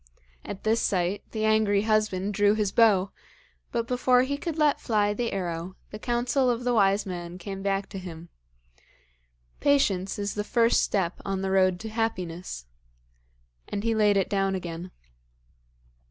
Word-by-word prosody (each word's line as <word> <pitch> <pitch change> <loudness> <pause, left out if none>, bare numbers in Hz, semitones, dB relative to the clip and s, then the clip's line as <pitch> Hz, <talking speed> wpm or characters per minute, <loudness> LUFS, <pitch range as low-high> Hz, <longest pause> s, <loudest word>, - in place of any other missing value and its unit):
At 195 - -7
this 225 +1 +2
sight 185 +1 0
the 220 -1 -2
angry 215 -2 +3
husband 215 -2 +1
drew 205 +1 +3
his 210 -2 0
bow, 200 -5 +4 0.6
but 230 -1 -1
before 250 +1 +3
he 280 +2 -1
could 315 +2 -4
let 300 -2 +2
fly 205 -3 +1
the 235 +2 -2
arrow, 175 -1 -4 0.2
the 210 - -7
counsel 245 +3 +1
of 240 0 -1
the 245 0 +1
wise 200 -2 +3
man 175 -2 -6
came 195 +1 -6
back 195 0 -1
to 195 - -6
him: 170 -2 -9 1.3
'Patience 200 -10 +2
is 205 0 -2
the 210 - -2
first 230 +2 +3
step 190 -3 -1
on 195 -1 -2
the 190 - -1
road 185 -2 +3
to 220 - -5
happiness.' 185 - -3 1.0
And 205 - -4
he 230 0 +1
laid 210 -2 +3
it 195 - +1
down 195 -1 0
again. 175 -1 -6
205 Hz, 160 wpm, -26 LUFS, 190-225 Hz, 1.3 s, bow